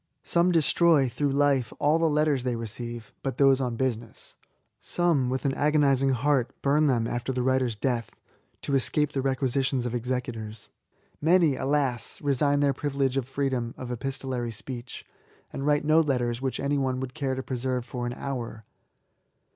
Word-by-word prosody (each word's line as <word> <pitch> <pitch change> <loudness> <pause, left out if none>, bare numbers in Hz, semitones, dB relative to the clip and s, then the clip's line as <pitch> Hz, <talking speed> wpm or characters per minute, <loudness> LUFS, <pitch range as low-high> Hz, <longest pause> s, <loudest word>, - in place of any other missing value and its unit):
Some 175 +1 +2
destroy, 165 -3 +4
through 145 +4 -1
life, 140 -4 +2
all 155 +3 +2
the 165 -1 +3
letters 150 -3 +1
they 125 -2 -1
receive, 115 0 -6
but 135 - -3
those 135 -1 +5
on 125 -2 -1
business. 115 -3 -4 0.4
Some, 165 -8 +1
with 130 +2 -2
an 135 - +2
agonising 140 -2 +3
heart, 130 0 0
bum 150 +2 +3
them 120 -4 +2
after 120 +2 -2
the 125 -1 -1
writer's 130 -2 +1
death, 120 +1 -1 0.5
to 140 - -2
escape 145 +2 +2
the 135 - -1
requisitions 135 -1 0
of 120 - -3
executors. 120 -3 -4 0.5
Many, 165 -2 +4
alas! 135 -4 -1
resign 145 0 +1
their 140 -1 +3
privilege 135 -1 -1
of 135 -3 -1
freedom 130 -3 -2
of 125 -1 -6
epistolary 130 -1 -3
speech, 120 +2 -8 0.5
and 135 - -3
write 145 0 +2
no 155 +1 +5
letters 125 -6 0
which 130 -1 -2
any 140 +1 0
one 130 -1 -1
would 130 -1 -5
care 135 -4 -2
to 130 - -4
preserve 125 -1 -2
for 120 -1 -4
an 120 - -3
hour. 120 -5 -5
130 Hz, 165 wpm, -27 LUFS, 120-145 Hz, 0.5 s, those